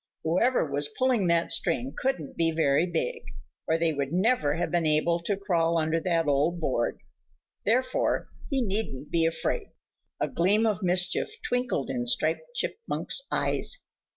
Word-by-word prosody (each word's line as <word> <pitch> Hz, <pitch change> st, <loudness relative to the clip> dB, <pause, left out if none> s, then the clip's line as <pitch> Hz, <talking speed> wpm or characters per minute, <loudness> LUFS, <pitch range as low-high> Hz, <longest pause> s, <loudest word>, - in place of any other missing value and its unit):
Whoever 185 Hz, +10 st, +2 dB
was 145 Hz, 0 st, +1 dB
pulling 250 Hz, -7 st, +2 dB
that 170 Hz, 0 st, +2 dB
string 135 Hz, -5 st, 0 dB
couldn't 215 Hz, -, -2 dB
be 165 Hz, -1 st, +2 dB
very 160 Hz, 0 st, +2 dB
big, 165 Hz, -8 st, -2 dB, 0.5 s
or 160 Hz, -, +2 dB
they 165 Hz, -1 st, +1 dB
would 140 Hz, -1 st, -2 dB
never 185 Hz, -5 st, +2 dB
have 175 Hz, +1 st, -2 dB
been 170 Hz, -2 st, +1 dB
able 155 Hz, +3 st, +2 dB
to 195 Hz, +4 st, -2 dB
crawl 170 Hz, -4 st, +1 dB
under 160 Hz, +1 st, +1 dB
that 165 Hz, -1 st, 0 dB
old 150 Hz, +4 st, +1 dB
board, 130 Hz, -7 st, -1 dB, 0.7 s
therefore 255 Hz, +4 st, +1 dB, 0.2 s
he 270 Hz, -3 st, +1 dB
needn't 195 Hz, -, -3 dB
be 165 Hz, -1 st, +3 dB
afraid. 400 Hz, -, -2 dB, 0.5 s
A -, -, +1 dB
gleam 205 Hz, +6 st, +2 dB
of 215 Hz, -3 st, 0 dB
mischief 180 Hz, -, +1 dB
twinkled 245 Hz, -, -1 dB
in 120 Hz, -2 st, -2 dB
Striped 160 Hz, -, 0 dB
Chipmunk's 465 Hz, +2 st, -1 dB
eyes. -, -, 0 dB
170 Hz, 155 wpm, -27 LUFS, 155-215 Hz, 0.7 s, be